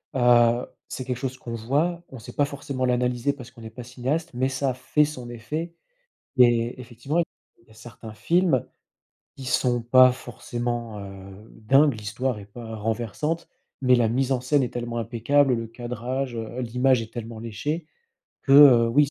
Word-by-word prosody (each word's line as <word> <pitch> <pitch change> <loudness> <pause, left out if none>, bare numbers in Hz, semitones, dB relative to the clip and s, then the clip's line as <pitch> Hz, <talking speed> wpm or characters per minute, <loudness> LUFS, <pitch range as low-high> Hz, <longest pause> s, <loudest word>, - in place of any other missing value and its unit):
heu, 120 -1 +4 0.2
c'est 130 - -5
quelque 125 -1 -2
chose 130 +1 -4
qu'on 120 - -7
voit, 150 +10 -1
on 130 - -10
sait - - -11
pas 145 - +2
forcément 140 -2 -4
l'analyser, 125 +1 +1
parce 125 -4 -11
qu'on 120 - -15
n'est 110 - -8
pas 120 +2 -9
cinéaste, 135 +7 -3
mais 130 +2 0
ça 130 0 -1
fait 150 +4 +2
son 130 -5 -7
effet 150 +9 -5 0.6
et 120 0 +4
effectivement, 125 +6 -3
il 160 -7 -7
y 110 - -21
a - - -16
certains 110 0 -11
films, 165 - +2 0.7
qui 135 - -9
sont 125 -1 +1
pas 130 +2 +6
forcément, 120 -3 -5
heu, 95 +2 -11
dingues, 135 +4 +3
l'histoire 110 +3 -3
est 100 - -10
pas 110 +2 -9
renversante, 120 +9 -3 0.3
mais 125 -1 +5
la 120 -2 +3
mise 130 +3 0
en 125 - +1
scène 140 +2 +2
est 125 - -1
tellement 120 -1 -4
impeccable, 125 +4 +2
le 115 0 -3
cadrage, 125 +2 -4
heu, 115 +3 -5
l'image 125 +1 +2
est 115 0 -8
tellement 115 -1 -7
léchée 150 +9 -4 0.6
que, - - -4
heu, 130 -5 +8
oui 145 +6 +4
ç 140 - -5
125 Hz, 180 wpm, -25 LUFS, 115-135 Hz, 0.7 s, heu